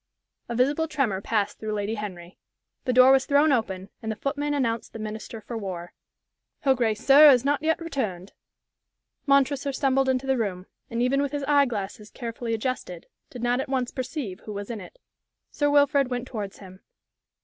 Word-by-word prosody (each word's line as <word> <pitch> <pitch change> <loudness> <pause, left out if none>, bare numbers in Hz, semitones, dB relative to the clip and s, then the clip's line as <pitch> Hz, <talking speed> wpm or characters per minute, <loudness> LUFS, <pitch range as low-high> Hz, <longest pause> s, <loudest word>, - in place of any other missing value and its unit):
A 235 - -3
visible 285 +6 +2
tremor 265 -11 -1
passed 205 -1 -1
through 215 -1 -3
Lady 205 +1 -2
Henry. 185 -5 -7 0.5
The 255 - +1
door 255 +1 +7
was 270 0 +4
thrown 290 +1 +4
open, 195 -6 -1
and 220 - -3
the - - -3
footman 290 +4 -2
announced 230 -5 -1
the - - -6
Minister 215 +1 -6
for 235 +3 -7
War. 185 -5 -6 0.7
"Her 270 -2 +4
grace, 225 -4 -1
sir, 290 +2 +9
is 255 -2 +5
not 285 0 +1
yet 320 +2 +1
returned." 215 - -4 0.9
Montresor 275 0 +3
stumbled 270 0 +2
into 260 0 0
the 265 -2 +1
room, 185 -4 -2 0.2
and 230 +1 -1
even 275 +3 +2
with 285 0 -2
his 290 -1 -2
eye 285 -1 +4
glasses 210 -2 -5
carefully 230 -1 -4
adjusted, 220 -7 -4 0.2
did 245 -2 -8
not 245 +1 +2
at - - -6
once 255 -2 -1
perceive 255 - -5
who 215 - -8
was 200 +2 -5
in 220 -3 -5
it. - - -13 0.5
Sir 290 -1 +1
Wilfrid 285 -1 +4
went 245 0 -4
towards 205 -6 -6
him. 185 -1 -13
245 Hz, 185 wpm, -25 LUFS, 210-275 Hz, 0.9 s, sir